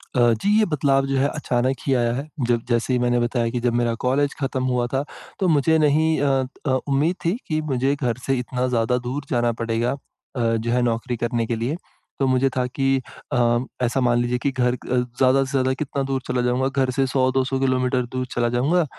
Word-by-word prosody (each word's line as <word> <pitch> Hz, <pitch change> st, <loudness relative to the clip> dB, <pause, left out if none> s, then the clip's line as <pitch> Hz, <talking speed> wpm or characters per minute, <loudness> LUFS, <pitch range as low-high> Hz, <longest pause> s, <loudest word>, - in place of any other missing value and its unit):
अ, -, -, +2 dB, 0.2 s
जी 210 Hz, +2 st, +3 dB
ये 215 Hz, -, +4 dB
बदलाव 135 Hz, -4 st, +1 dB
जो 135 Hz, 0 st, 0 dB
है 140 Hz, +2 st, +3 dB
अचानक 130 Hz, -3 st, -1 dB
ही 135 Hz, -, +3 dB
आया 120 Hz, -1 st, +1 dB
है। 140 Hz, +4 st, -4 dB, 0.2 s
जब 120 Hz, -1 st, +2 dB
जैसे 120 Hz, +2 st, +1 dB
ही 125 Hz, -, +2 dB
मैंने 120 Hz, 0 st, +2 dB
बताया 120 Hz, -1 st, 0 dB
कि 120 Hz, 0 st, -2 dB
जब 120 Hz, -1 st, +1 dB
मेरा 120 Hz, -1 st, +1 dB
कॉलेज 140 Hz, +2 st, +1 dB
खत्म 135 Hz, -1 st, -2 dB
हुआ 125 Hz, -1 st, 0 dB
था, 135 Hz, +2 st, +1 dB, 0.4 s
तो 190 Hz, -, +1 dB
मुझे 160 Hz, 0 st, +3 dB
नहीं 155 Hz, +1 st, +3 dB
अ 135 Hz, -2 st, +2 dB, 0.2 s
अ, 135 Hz, -, +1 dB, 0.2 s
उम्मीद 145 Hz, +6 st, +1 dB
थी 180 Hz, +7 st, +1 dB
कि 155 Hz, -1 st, 0 dB
मुझे 135 Hz, -1 st, 0 dB
घर 125 Hz, -4 st, -1 dB
से 135 Hz, -, +1 dB
इतना 125 Hz, +1 st, -2 dB
ज़्यादा 120 Hz, 0 st, +1 dB
दूर 125 Hz, +4 st, -4 dB
जाना 120 Hz, -1 st, +1 dB
पड़ेगा 115 Hz, +1 st, 0 dB
अ, 140 Hz, -, -3 dB, 0.4 s
जो 115 Hz, 0 st, 0 dB
है 125 Hz, 0 st, +2 dB
नौकरी 120 Hz, +1 st, -1 dB
करने 120 Hz, 0 st, -1 dB
के 115 Hz, -, -1 dB
लिए। 120 Hz, +8 st, -2 dB, 0.4 s
तो 135 Hz, -, +2 dB
मुझे 130 Hz, +1 st, +3 dB
था 125 Hz, -1 st, +1 dB
कि 135 Hz, +2 st, -3 dB, 0.5 s
अ, 120 Hz, -1 st, +3 dB, 0.2 s
ऐसा 125 Hz, +2 st, +1 dB
मान 120 Hz, -1 st, +3 dB
लीजिए 120 Hz, 0 st, 0 dB
कि 140 Hz, -, 0 dB
घर 125 Hz, -1 st, +1 dB
अ, 125 Hz, 0 st, -3 dB
ज़्यादा 130 Hz, +2 st, +2 dB
से 135 Hz, -, -6 dB
ज़्यादा 130 Hz, -1 st, +1 dB
कितना 140 Hz, 0 st, -3 dB
दूर 135 Hz, -1 st, -2 dB
चला 125 Hz, 0 st, 0 dB
जाऊँगा? 125 Hz, +2 st, +1 dB
घर 135 Hz, -1 st, 0 dB
से 135 Hz, -1 st, +2 dB
100-200 130 Hz, 0 st, +1 dB
किलोमीटर 130 Hz, -1 st, +1 dB
दूर 130 Hz, 0 st, -1 dB
चला 120 Hz, -1 st, 0 dB
जाऊँगा, 160 Hz, +7 st, +2 dB
130 Hz, 220 wpm, -22 LUFS, 120-135 Hz, 0.5 s, ये